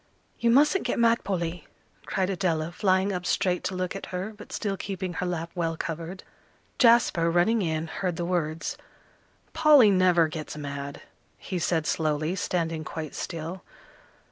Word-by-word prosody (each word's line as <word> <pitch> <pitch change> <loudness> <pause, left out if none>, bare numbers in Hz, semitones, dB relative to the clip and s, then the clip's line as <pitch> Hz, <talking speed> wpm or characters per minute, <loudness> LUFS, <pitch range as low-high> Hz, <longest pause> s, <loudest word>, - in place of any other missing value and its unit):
"You 235 - +2
mustn't 295 +10 +4
get - - -1
mad, 235 0 +3
Polly," 175 -4 -3 0.4
cried 190 -2 0
Adela, 170 -4 -1
flying 190 +1 +1
up 180 -1 -3
straight 180 0 0
to 190 - -2
look 185 0 -2
at 195 - -6
her, 185 +4 -4
but 210 - -12
still 200 -3 -2
keeping 190 -2 -4
her 180 - -2
lap 170 -1 -3
well 165 -2 -2
covered. 165 +4 -5 0.6
Jasper, 230 -9 +5
running 185 +7 +3
in, 160 -3 -1
heard 175 +2 -3
the 170 - -3
words. 170 - -2 0.8
"Polly 285 -9 +7
never 180 -3 +4
gets 155 -1 -6
mad," 140 -1 -6 0.3
he 185 - -4
said 165 -1 0
slowly, 155 +2 0
standing 165 -4 -1
quite 155 -1 -6
still. 170 +2 -5
180 Hz, 155 wpm, -27 LUFS, 165-195 Hz, 0.8 s, Polly